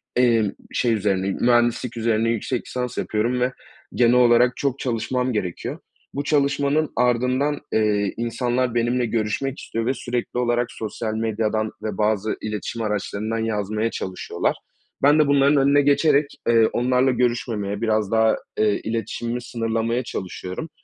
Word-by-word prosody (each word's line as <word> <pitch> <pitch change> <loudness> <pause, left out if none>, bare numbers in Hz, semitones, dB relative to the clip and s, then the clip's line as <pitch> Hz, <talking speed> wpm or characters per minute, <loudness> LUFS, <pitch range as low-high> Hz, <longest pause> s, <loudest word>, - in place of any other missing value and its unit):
emm, 115 -5 +3 0.2
şey 120 -2 +1
üzerine, 100 -2 0
mühendislik 120 0 +2
üzerine 115 0 +1
yüksek 115 +2 -2
lisans 125 -1 -4
yapıyorum 115 +4 0
ve 125 +1 +2 0.4
genel 120 -1 +4
olarak 125 0 +4
çok 140 -1 -1
çalışmam 125 +1 -1
gerekiyor. 90 -5 -3 0.3
Bu 140 - -2
çalışmanın 145 +1 +1
ardından, 125 +4 +1
eee, 105 -2 +1
insanlar 120 +1 -1
benimle 120 +1 +1
görüşmek 115 +4 -2
istiyor 115 0 -4
ve 130 - +1
sürekli 125 -1 -3
olarak 120 0 0
sosyal 110 0 -4
medyadan 110 -1 -1
ve 105 -3 -3
bazı 105 0 0
iletişim 110 +2 -4
araçlarından 105 +1 -2
yazmaya 110 0 -1
çalışıyorlar. 95 -1 -2 0.5
Ben 145 +2 +6
de 150 - +4
bunların 140 +1 +4
önüne 140 +1 +4
geçerek, 145 +1 +3 0.2
eee, 115 -1 +5
onlarla 125 +2 +2
görüşmemeye, 115 -5 -1
biraz 110 -2 0
daha, 110 0 +4 0.2
eee, 105 -1 +3
iletişimimi 115 +2 -3
sınırlamaya 115 0 -1
çalışıyorum. 95 - -6
115 Hz, 135 wpm, -23 LUFS, 110-125 Hz, 0.5 s, Ben